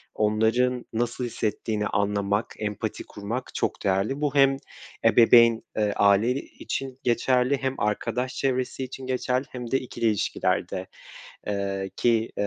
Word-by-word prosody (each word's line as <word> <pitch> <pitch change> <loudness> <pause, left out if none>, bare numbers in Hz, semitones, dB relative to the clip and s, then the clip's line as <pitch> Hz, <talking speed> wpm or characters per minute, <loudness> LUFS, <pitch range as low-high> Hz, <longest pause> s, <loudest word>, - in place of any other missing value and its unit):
onların 110 +4 +1
nasıl 120 +2 -1
hissettiğini 110 -2 -2
anlamak, 100 +1 0
empati 105 0 -3
kurmak 110 +5 -6
çok - - -2
değerli. 100 +8 0
Bu 145 -2 0
hem 135 -1 +5 0.5
ebeveyn, 115 0 +6 0.2
eee, 105 -1 +1
aile 100 +4 +4
için 135 -1 -5
geçerli 125 +2 +2
hem 135 0 -2
arkadaş 115 +5 -1
çevresi 130 0 -1
için 130 +1 -7
geçerli 130 +1 0
hem 125 -2 -7
de 135 - +3
ikili 120 -2 -5
ilişkilerde 105 -3 0 0.6
eee, 100 -1 -2
ki 115 -2 +1
115 Hz, 125 wpm, -26 LUFS, 105-130 Hz, 0.6 s, ebeveyn